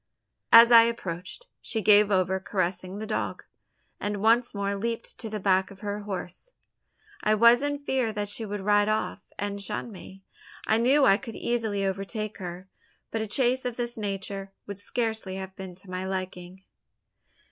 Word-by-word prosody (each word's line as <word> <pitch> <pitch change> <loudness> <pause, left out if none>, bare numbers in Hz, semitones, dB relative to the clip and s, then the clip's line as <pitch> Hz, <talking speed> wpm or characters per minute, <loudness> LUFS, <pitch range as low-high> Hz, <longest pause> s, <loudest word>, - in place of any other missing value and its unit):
As 230 +1 +9
I 230 -1 +10
approached, 185 - -5 0.2
she 225 - -2
gave 210 0 +6
over 190 -1 +2
caressing 185 0 -2
the 215 - -5
dog; 215 - -3 0.6
and 205 0 -2
once 230 +3 +3
more 200 -1 -2
leaped 230 +3 -4
to 225 - -6
the 215 0 -4
back 190 -1 +2
of 195 -1 -14
her 205 -1 -3
horse. 205 - -6 0.7
I 215 0 +3
was 235 +3 +6
in 285 0 -1
fear 265 -5 -1
that 205 -1 -3
she 205 +3 -4
would 205 -1 -4
ride 205 +1 +3
off, 215 0 -1 0.2
and 200 0 -3
shun 210 +4 -4
me. 195 -1 -12 0.4
I 220 - +3
knew 270 +4 +4
I 195 - +6
could 230 -2 -9
easily 220 -4 -1
overtake 200 +3 -3
her; 180 0 -7 0.4
but 225 - -2
a 220 - -3
chase 255 +4 +1
of 250 -2 -3
this 240 0 -2
nature 195 -2 -4
would 200 -1 -7
scarcely 220 -3 -3
have 190 0 -7
been 185 -2 -8
to 185 +1 -14
my 185 0 -3
liking. 185 0 -5
205 Hz, 175 wpm, -27 LUFS, 190-230 Hz, 0.7 s, I